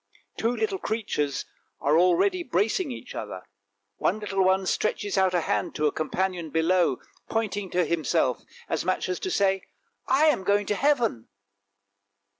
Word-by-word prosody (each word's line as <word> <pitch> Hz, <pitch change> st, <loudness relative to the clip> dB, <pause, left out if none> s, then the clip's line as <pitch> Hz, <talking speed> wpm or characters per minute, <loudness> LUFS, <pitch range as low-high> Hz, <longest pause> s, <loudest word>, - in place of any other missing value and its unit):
Two 230 Hz, +2 st, 0 dB
little 400 Hz, -, -1 dB
creatures 175 Hz, -11 st, -2 dB, 0.3 s
are 145 Hz, +1 st, +2 dB
already 180 Hz, -, +3 dB
embracing 245 Hz, -, 0 dB
each 245 Hz, +1 st, -8 dB
other, 100 Hz, -4 st, -6 dB, 0.5 s
one 195 Hz, -, +1 dB
little 195 Hz, -2 st, 0 dB
one 190 Hz, +1 st, +3 dB
stretches 205 Hz, +1 st, -1 dB
out 190 Hz, -2 st, +3 dB
a 175 Hz, -, +3 dB
hand -, -, -1 dB
to 150 Hz, -, 0 dB
a 150 Hz, -, +3 dB
companion 175 Hz, +1 st, -2 dB
below, 165 Hz, -2 st, +2 dB, 0.3 s
pointing 205 Hz, -3 st, -2 dB
to 180 Hz, -1 st, +1 dB
himself 150 Hz, -6 st, +1 dB, 0.3 s
as 160 Hz, -, -1 dB
much 185 Hz, +1 st, 0 dB
as 180 Hz, -1 st, -2 dB
to 375 Hz, -, -3 dB
say, 195 Hz, -, +2 dB, 0.3 s
" 465 Hz, -, -48 dB
I 280 Hz, +4 st, +4 dB
am 300 Hz, -11 st, +3 dB
going 205 Hz, +2 st, +2 dB
to 205 Hz, -, 0 dB
heaven! 240 Hz, -, +1 dB
190 Hz, 160 wpm, -26 LUFS, 170-225 Hz, 0.5 s, I